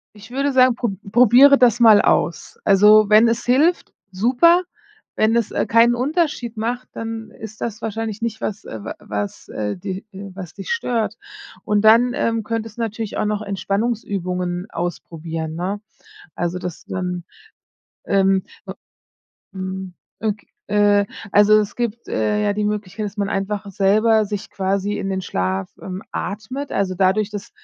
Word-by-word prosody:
Ich 215 +3 -14
würde 275 +2 0
sagen, 255 -1 +5
pro 240 -1 -1 0.2
probiere 250 +5 +7
das 240 -2 +4
mal 220 -3 +7
aus. 170 - 0
Also, 210 +1 +6
wenn 215 +2 +6
es 230 0 -1
hilft, 290 +8 +2 0.2
super, 255 - +4 0.5
wenn 220 +1 +2
es, 235 -2 0
äh, - - 0
keinen 230 +2 +5
Unterschied 265 -3 -1
macht, 240 +3 -3
dann 225 0 -6
ist 220 0 -11
das 220 -2 -4
wahrscheinlich 225 -1 -4
nicht 225 -1 -3
was, 210 -1 -4
äh, 110 - -7
wa 110 - -6
was, 105 -1 -5
äh, 105 -1 -3
di 185 - -5
äh, 195 0 -9
was 185 -3 -9
dich - - -6
stört. 245 - -1 0.5
Und 210 -1 +1
dann, 230 +3 +5
ähm, 225 -1 0
könntest 225 0 -4
du 235 - -4
natürlich 225 -1 -4
auch - - 0
noch 210 0 -1
Entspannungsübungen 195 -3 -2
ausprobieren, 165 -2 -5
ne? 190 +4 -3 0.6
Also, 175 +1 -2
das 180 -2 -7
du - - -6
dann, 180 -1 -3 0.8
ähm, 195 -1 +2 0.2
u - - -4 0.8
mhm. 190 -1 -6 0.3
Ok 215 -2 -2 0.3
äh, 205 -1 +3 0.3
also, 210 +1 +6
es 210 - -4
gibt, 235 -1 -3
äh, 210 0 0
ja 205 - +2
die 210 +1 -2
Möglichkeit, 210 0 -3
dass 205 - -8
man 200 -1 -1
einfach 200 +1 -3
selber 215 +3 +3
sich 205 -1 -5
quasi 195 +1 -1
in 195 - -3
den 190 0 -1
Schlaf, 95 - -2
ähm, 190 +1 -6
atmet. 255 +9 -5
Also, 190 -2 0
dadurch, 195 +3 +2
dass 205 -1 -7
210 Hz, 165 wpm, -20 LUFS, 190-230 Hz, 0.8 s, probiere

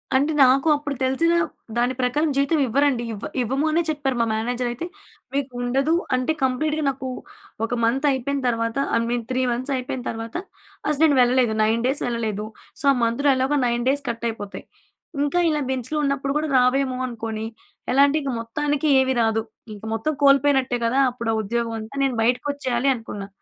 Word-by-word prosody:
అంటే 285 +4 +3
నాకు 265 +4 +4
అప్పుడు 290 -1 -4
తెలిసిన 265 +6 +2 0.4
దాని 245 +2 +2
ప్రకారం 290 +5 +1
జీతం 280 +3 +2
ఇవ్వరండి. 265 0 +2
ఇవ్వ 205 - -7 0.2
ఇవ్వము 265 +5 0
అనే 335 +2 +3
చెప్పారు 285 -4 -1
మా - - +3
మేనేజర్ 240 +3 -1
అయితే. 240 +8 -5 0.5
మీకు 275 -1 -1
ఉండదు 270 +6 +1 0.2
అంటే 255 +4 0
కంప్లీట్‌గా 305 +4 0
నాకు 265 -1 -4 0.6
ఒక 235 - -4
మంత్ 260 +6 +1
అయిపోయిన 275 +2 -1
తర్వాత 230 0 -1 0.2
ఐ - - +4
మీన్ 240 -1 -1
3 255 - +1
మంత్స్ 255 +4 -2
అయిపోయిన 255 0 -4
తర్వాత 225 0 -6 0.5
అసల 300 0 -1
నేను 290 -4 +5
వెళ్ళలేదు. 245 -2 +3
9 225 +2 +1
డేస్ 270 +3 0
వెళ్ళలేదు. 220 -3 -2 0.3
సో - - -4
ఆ - - -2
మంత్‌లో 235 +5 +2
ఎలాగో 265 +3 +1
9 240 0 0
డేస్ 285 +1 +1
కట్ 235 0 -4
అయిపోతాయి. 205 -3 -7 0.6
ఇంకా 290 +5 +1
ఇలా 300 -1 0
బెంచ్‌లో 260 +3 -2
ఉన్నప్పుడు 275 -1 0
గూడా 305 0 -1
రావేమో 255 +1 +2
అనుకోని 225 -2 -5 0.5
ఎలా 270 +2 +4
అంటే 290 +2 +1
ఇక 275 - -2
మొత్తానికి 290 +6 -1
ఏమీ 265 0 +1
రాదు. 225 0 +2 0.3
ఇంక 205 - -14
మొత్తం 305 +7 -1
కోల్పోయినట్టే 275 -2 +4
గదా! 255 +4 +2
అప్పుడు 235 -2 -4
ఆ - - 0
ఉద్యోగం 230 +2 -2
అంతా 220 +5 -9
నేను 270 -2 +1
బయటకి 245 +4 +1
వచ్చేయాలి 265 -2 0
అనుకున్నా. 210 -4 -7
255 Hz, 175 wpm, -23 LUFS, 235-280 Hz, 0.6 s, నేను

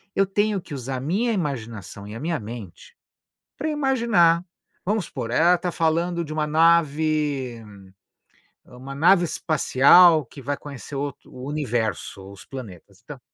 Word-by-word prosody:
eu 195 - +3
tenho 205 +1 0
que 150 - -11
usar 130 0 -4
a - - -4
minha 205 - 0
imaginação 115 - -5
e 105 - -8
a - - -6
minha 165 -2 -1
mente 105 -5 -10 0.6
pra 310 +3 -3
imaginar, 235 - +2 0.4
vamos 205 -2 -1
supor, 120 -4 -6
ela 175 +6 +4
tá 175 0 -3
falando 170 +1 0
de 155 - -8
uma 155 -1 -1
nave 150 -6 +1 1.0
uma 130 +2 -10
nave 175 +4 +5
espacial 155 +1 +5
que 130 - -13
vai 140 +3 -2
conhecer 140 0 -9
outro, 140 0 -5
o 130 +1 -8
universo, 110 - -3
os 100 - -13
planetas 100 -6 -10
tá. 140 +1 -10
150 Hz, 150 wpm, -23 LUFS, 125-175 Hz, 1.0 s, nave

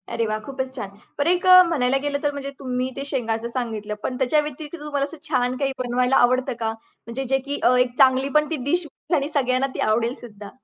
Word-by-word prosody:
अरे 230 - 0
वाह! 215 0 -2
खूपच 260 +2 -5
छान. 200 - -5 0.3
बर 285 - +2
एक 360 +1 +2
अ, 365 0 +10
म्हणायला 270 -5 +2
गेलं 285 -1 0
तर 290 - +2
म्हणजे 280 -1 -5
तुम्ही 255 -1 -2
ते 275 - -3
शेंगाचं 230 -4 -1
सांगितलं, 220 -4 -3
पण 250 - -3
त्याच्या 270 +3 +2
व्यतिरिक्त 300 +2 -7
तुम्हाला 285 -2 -1
असं 310 +3 -5
छान 250 -2 +1
काही 275 0 0
बनवायला 250 +1 +1
आवडतं 255 +1 0
का? 225 - -1 0.4
म्हणजे 245 +3 -4
जे, 270 +1 +1
की 280 +2 -5
अ, 250 - +5
एक 250 0 0
चांगली 260 +1 +4
पण 300 0 +1
ती - - +1
डिश 350 0 0 0.3
आणि 280 +1 0
सगळ्यांना 265 -2 +1
ती - - -5
आवडेलसुद्धा. 225 -2 -2
260 Hz, 215 wpm, -23 LUFS, 245-285 Hz, 0.4 s, अ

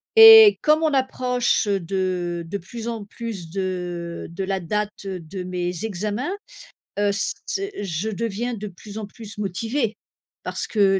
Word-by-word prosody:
Et 445 -1 +10
comme 305 +1 +4
on 310 - +2
approche, 255 -3 +1
heu, 200 -1 +1
de 180 -1 -2
de 200 - -3
plus 230 +6 -8
en 230 -3 -3
plus 205 -5 -7
de 180 -2 -4
de 180 +3 -4
la 190 0 -1
date, 210 +4 -1
heu, 190 -2 -4
de 170 +3 -7
mes 180 +2 -3
examens. 210 - -2 0.7
Heu, 205 0 +2
c 200 - +1
ce 390 - -2 0.2
je 190 +4 -2
deviens 230 +3 -2
de 210 0 -6
plus 205 +2 -10
en 215 - -4
plus 210 +1 -11
motivée. 220 +4 -1 0.5
Parce - - -3
que 195 -3 +3
200 Hz, 165 wpm, -23 LUFS, 185-230 Hz, 0.7 s, Et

